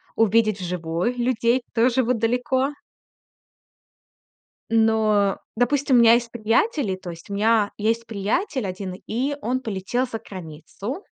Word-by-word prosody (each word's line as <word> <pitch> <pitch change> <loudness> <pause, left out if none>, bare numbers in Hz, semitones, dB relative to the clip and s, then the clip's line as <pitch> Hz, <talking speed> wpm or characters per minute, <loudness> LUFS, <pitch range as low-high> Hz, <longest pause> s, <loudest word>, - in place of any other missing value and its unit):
увидеть 220 -1 +3
вживую 175 +4 -2
людей 240 0 +1
тоже, 245 +2 +3
вот 245 +1 +1
далеко. 250 +4 +1 2.0
Но, 220 -3 +2 0.2
допустим, 265 +2 +2
у - - +7
меня 230 0 +7
есть 235 -1 0
приятели, 230 - 0
то 185 -1 -8
есть, 170 +3 -11
у - - -3
меня 215 0 +2
есть 225 +2 0
приятель 225 - -1
один, 185 0 -5
и 265 +6 -1
он 255 0 -1
полетел 225 +2 -2
за 230 -2 -5
границу. 190 - -8
225 Hz, 130 wpm, -23 LUFS, 200-245 Hz, 2.0 s, у